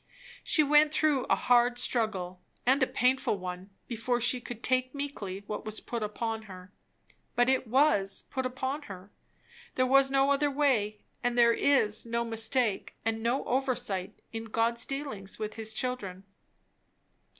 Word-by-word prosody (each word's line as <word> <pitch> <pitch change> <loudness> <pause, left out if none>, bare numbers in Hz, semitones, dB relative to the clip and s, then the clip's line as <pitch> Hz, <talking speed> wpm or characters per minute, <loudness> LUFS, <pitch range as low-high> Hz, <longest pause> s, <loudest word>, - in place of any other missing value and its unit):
She 310 - +3
went 300 +1 +5
through 305 -4 +2
a - - +3
hard 245 0 +3
struggle 195 -7 -1 0.2
and 265 +3 +3
a 260 - +4
painful 250 -4 +1
one, 180 +1 -7 0.2
before 240 +1 -1
she 245 +1 +2
could 240 -1 -8
take 255 +1 +1
meekly 205 -9 -5
what 210 - -5
was 215 0 -3
put 235 -1 -5
upon 220 +1 -3
her. 185 +1 -11 0.6
But 245 +1 +3
it 260 -2 +1
was 220 -6 +2
put 260 - -2
upon 260 +3 -3
her; 190 +1 -10 0.6
there 255 - +3
was 270 +1 +5
no 275 +1 +3
other 290 +1 +2
way; 250 -8 +1 0.2
and 245 0 0
there 235 -1 +6
is 225 -6 +2
no 235 0 -1
mistake 225 -1 0
and 225 0 -1
no 240 +4 0
oversight 245 -7 -2
in 225 0 -4
God's 230 +1 -1
dealings 275 -9 -4
with 215 -1 -4
his 220 -1 -5
children. 210 -7 -3
240 Hz, 155 wpm, -29 LUFS, 210-260 Hz, 0.6 s, there